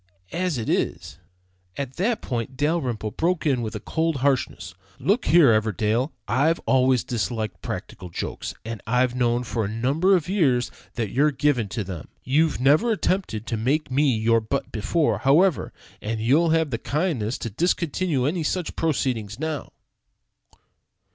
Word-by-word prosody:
As 180 -4 -1
it 115 - -4
is - - -2 0.3
" 90 0 -29
At 135 -2 -5
this 215 +6 +1
point 125 +1 -4
Dalrymple 135 -8 -1
broke 170 - 0
in 135 -5 +2
with 110 -1 -4
cold 165 0 0
harshness: 130 -10 -1 0.2
"Look 210 +6 +1
here, 160 -9 +6
Everdell, 110 - +1 0.2
I 140 +7 +3
always 130 -2 +3
disliked 110 -1 -3
practical 90 - -6
jokes, - - -5
and 115 -1 -5
I've 125 +2 +2
known 120 -1 +1
for 115 -1 -2
a - - -1
number 135 - +2
of 170 -5 -1
years 140 -11 +2 0.2
that 115 -4 -2
you're 145 +4 +3
given 140 -6 +1
to 105 +1 -3
them. 90 -4 -7 0.2
You've 155 +5 +2
never 150 - +4
attempted 185 - -1
to 115 - -2
make 135 +7 0
me 135 -3 +3
your 115 +1 +3
butt 110 - -3
before, 150 +9 0
however, 155 +5 +3 0.3
and 110 +1 -3
you'll 145 +10 +3
have 160 -2 +2
the 115 - -2
kindness 130 - -1
to 115 - -5
discontinue 165 - 0
any 165 +5 0
such 170 +2 -2
proceeding 130 -9 -1
now." 155 0 -4
130 Hz, 155 wpm, -24 LUFS, 115-160 Hz, 0.3 s, here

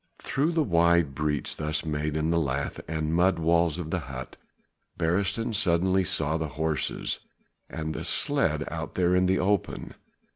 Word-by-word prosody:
Through 150 +5 0
the 160 -1 +3
wide 85 - +3
breach 75 0 -1
thus 75 +1 -1
made 75 0 -1
in 80 +1 0
the 85 - +3
lath 70 -2 -2
and 80 0 -2
mud 90 +1 +3
walls 85 0 +2
of 80 -3 -5
the 95 - 0
hut, 65 -4 -7 0.6
Beresteyn 100 +7 0
suddenly 95 0 +2
saw 80 -2 0
the 80 -1 -2
horses 80 -2 -1 0.5
and 80 0 -4
the - - -5
sledge - - +1
out - - -5
there 90 0 +3
in 90 0 +3
the 95 +1 +3
open. 100 +1 -1
85 Hz, 160 wpm, -27 LUFS, 75-90 Hz, 0.6 s, the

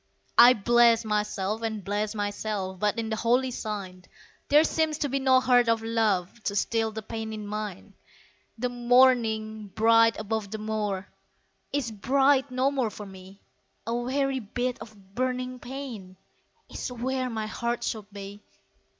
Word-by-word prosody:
I 245 +1 +10
bless 235 +1 +4
myself 210 0 -1
and 220 -3 -3
bless 205 +2 -2
myself, 205 -2 -3
But 210 +3 0
in 225 -1 -3
the - - +1
holy 245 +3 +1
sign, 200 -6 -6 0.4
There 295 +2 +6
seems 315 -1 0
to 290 -2 -1
be 275 +1 0
no 260 -1 +5
heart 245 -2 +3
of 225 -1 +1
love, 225 -3 0
To 200 - -1
still 225 +2 0
the 220 0 -6
pain 220 +1 -5
in 215 -1 -6
mine. 210 -2 -6 0.6
The 250 +2 -1
morning, 240 -3 +2
bright 225 +3 +4
above 215 -1 -3
the 220 - -5
moor, 210 -3 -3 0.6
Is 275 -5 -1
bright 270 +5 +2
no 255 +2 +1
more 260 -5 0
for 210 0 -9
me 190 0 -13 0.4
A 230 - -2
weary 265 +3 0
bit 245 +3 -3
of 200 -3 -14
burning 255 +1 -2
pain 240 -9 -8 0.5
Is - - -6
where 255 +1 -2
my 220 -2 -3
heart 235 +2 -3
should 210 -2 -4
be! 200 0 -9
225 Hz, 155 wpm, -27 LUFS, 210-250 Hz, 0.6 s, I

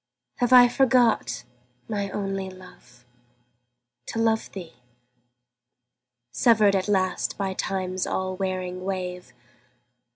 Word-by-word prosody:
Have 245 -1 0
I 250 -1 +9
forgot, 240 - +2 0.4
my 200 -2 -2
only 195 -1 -3
love, 125 -10 -16 1.0
to - - -5
love 225 -1 +1
thee, 175 -7 -9 1.6
Severed 210 - +4
at 190 +1 0
last 185 -3 0
by 195 -2 -2
Time's 185 -1 -2
all 185 0 -2
wearing 185 -1 -3
wave? 180 -5 -4
190 Hz, 100 wpm, -25 LUFS, 185-215 Hz, 1.6 s, I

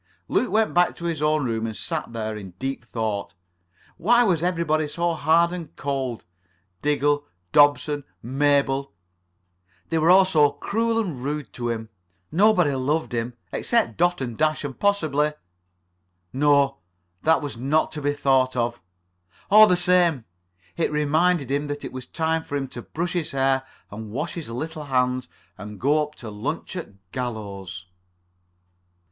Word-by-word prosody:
Luke 250 - +1
went 220 +1 +2
back 175 0 +3
to 170 - -8
his 165 -3 -2
own 150 -1 +2
room 115 -1 -1
and 110 - -5
sat 165 -7 -4
there 110 -2 -4
deep 115 +9 -5
in - - -33
thought. 110 -5 -3 0.6
Why 235 +8 +4
was 180 -8 +2
everybody 165 -3 +1
so 170 +3 -1
hard 165 +2 +3
and 170 -4 -7
cold? 135 -4 -3 0.6
Diggle, 145 0 +1 0.2
Dobson, 145 +1 +4 0.2
Mabel—they 100 - -2
were 160 +2 +3
all 190 +1 +8
so 150 -6 +3
cruel 225 +10 -1
and 170 - -2
rude 145 -6 -4
to 120 -1 -3
him. 110 -1 -4 0.4
Nobody 180 -4 +4
loved 145 +5 -1
him. 120 0 -3 0.2
Except 235 -2 +1
Dot 175 -2 +1
and 120 -3 -3
Dash, 155 +4 +1
and 140 -3 -6
possibly... 155 -7 +1 1.0
No, 140 0 +3 0.4
that 160 -1 +3
was 145 - -4
not 140 +6 +1
to 150 - -5
be 145 0 +1
thought 130 -2 +2
of. 120 -2 -1 0.7
All 215 +1 +9
the 180 - +3
same 175 -8 +3 0.5
it 165 - 0
reminded 150 0 +2
him 145 +1 0
that 145 -1 -5
it - - -7
was 130 -1 -7
time 160 0 -1
for 145 - -5
him 135 -1 -2
to 120 - -7
brush 170 +8 -4
his 170 -4 -1
hair 135 0 +1 0.3
and 110 +1 -7
wash 150 +9 -3
his 165 -8 -6
little 150 +6 -5
hands, 125 -1 0 0.3
and 105 -1 -8
go 145 +4 +3
up 150 0 -4
to 110 -3 -8
lunch 140 - -4
at 175 - -5 0.2
Gallows. 100 -6 -5
145 Hz, 155 wpm, -24 LUFS, 125-165 Hz, 1.0 s, All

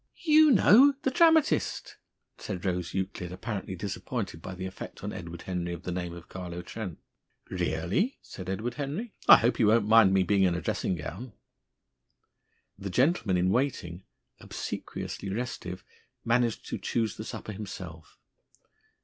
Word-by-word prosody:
"You 310 -1 +6
know 265 +4 +7
the 265 - +1
dramatist," 320 0 +3 0.4
said 90 +1 -5
Rose 90 -2 -2
Euclid, 95 -2 -3
apparently 95 -1 -5
disappointed 95 -1 -4
by 95 - -7
the 95 +1 -5
effect 95 - -8
on - - -4
Edward 85 -1 -8
Henry 90 -2 -3
of 85 +1 -8
the 90 - -4
name 90 -1 -3
of 85 -1 -11
Carlo 90 -2 -7
Trent. 95 -3 -6 0.5
"Really!" 90 - 0
said 95 -1 -8
Edward 110 +5 -2
Henry. 150 - -4 0.2
"I - - +12
hope 115 +1 +1
he - - +2
won't 105 0 +4
mind 110 -3 +7
me 95 -1 +4
being 100 +1 +2
in 90 -2 +3
a - - -1
dressing 95 - -1
gown." 95 - -7 1.5
The 100 - -5
gentleman 125 - +2
in 90 +1 +2
waiting, 100 -9 -1 0.4
obsequiously 100 - -5
restive, 95 -4 -4 0.4
managed 115 -1 +1
to - - -3
choose 110 -3 -1
the 110 - -6
supper 110 - -6
himself. 95 -6 -8
95 Hz, 150 wpm, -28 LUFS, 90-120 Hz, 1.5 s, I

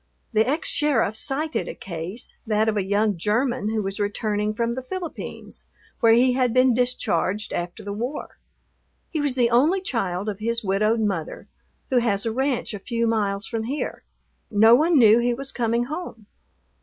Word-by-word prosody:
The 220 +3 +3
ex 310 +4 -1
sheriff 285 -8 +1
cited 295 +6 -1
a - - -6
case, 175 +5 -6
that 215 0 +2
of 220 - +1
a 205 - +1
young 205 +1 +1
German 215 +4 0
who 220 -1 -1
was 195 +2 -4
returning 210 +1 -1
from 235 0 0
the 260 - -4
Philippines, 340 +5 -7 0.3
where 230 -1 +5
he 250 +2 +4
had 250 -2 +1
been 255 0 +5
discharged 225 -4 0
after 175 0 -4
the 200 0 -5
war. 245 +8 -5 0.7
He 310 - -1
was 285 -3 0
the 240 -2 +2
only 300 +11 +4
child 200 - -2
of 205 -2 -3
his 230 +1 -1
widowed 215 +3 +1
mother, 195 -7 -3 0.4
who 255 - +4
has 205 -4 0
a 225 - 0
ranch 260 -1 -1
a 205 - -5
few 235 +3 -2
miles 205 -3 0
from 225 -1 -3
here. 280 +5 -4 0.5
No 220 +2 +6
one 315 +6 +4
knew 225 -2 +7
he 240 0 +1
was 270 +1 -4
coming 235 0 0
home. 250 - -6
230 Hz, 180 wpm, -24 LUFS, 210-255 Hz, 0.7 s, knew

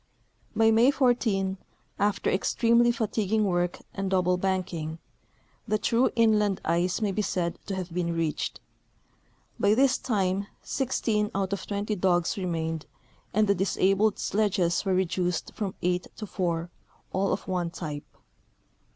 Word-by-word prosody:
By 225 0 +5
May 230 +4 +5
14, 220 -8 +1 0.4
after 205 0 +1
extremely 235 +4 +3
fatiguing 215 -2 0
work 175 -2 0 0.2
and 195 -1 -2
double 180 -1 +2
banking, 180 -4 -2 0.7
the 215 -1 +2
true 230 +4 +2
inland 210 -4 +3
ice 175 +5 +1
may 210 -2 +1
be 210 - -1
said 175 -4 -2
to 195 - -2
have 185 -2 -5
been 170 -1 -1
reached. 165 -2 -2 1.0
By 205 +1 +4
this 265 +1 +3
time 200 -4 0 0.2
16 225 -5 0
out 195 0 0
of 200 - -4
20 205 +1 -2
dogs 175 -2 +2
remained 165 -4 -3 0.4
and 215 +1 +2
the 200 - +4
disabled 195 +2 +2
sledges 195 -5 +1
were 190 -2 +1
reduced 180 -1 -1
from 200 -3 -4
eight 180 0 0
to 215 - -6
four, 175 -3 -2 0.4
all 195 +1 +1
of 190 - -3
one 180 -2 -1
t3q)e. 155 -4 -5
195 Hz, 140 wpm, -27 LUFS, 180-215 Hz, 1.0 s, By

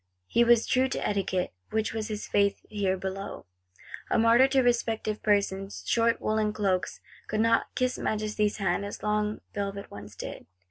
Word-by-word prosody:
He 235 - +3
was 235 -1 +5
true 255 +1 +2
to 265 - -2
Etiquette, 190 -3 -1 0.2
which 220 0 -1
was 220 -1 -3
his 215 -1 -4
Faith 200 0 +1
here 195 -3 0
below; 190 +1 -5 0.6
a - - +2
martyr 230 +3 +6
to 270 -1 +3
respect 235 -3 +1
of 215 0 -2
persons. 200 -1 0
Short 230 0 +2
woollen 215 -1 0
cloaks 195 -4 -1 0.3
could 215 - -2
not 230 0 +3
kiss 255 0 0
Majesty's 210 -1 0
hand 195 -1 0
as 205 - -7
long 210 0 0
velvet 200 0 -4
ones 105 0 -10
did. - - -7
210 Hz, 170 wpm, -28 LUFS, 200-230 Hz, 0.6 s, martyr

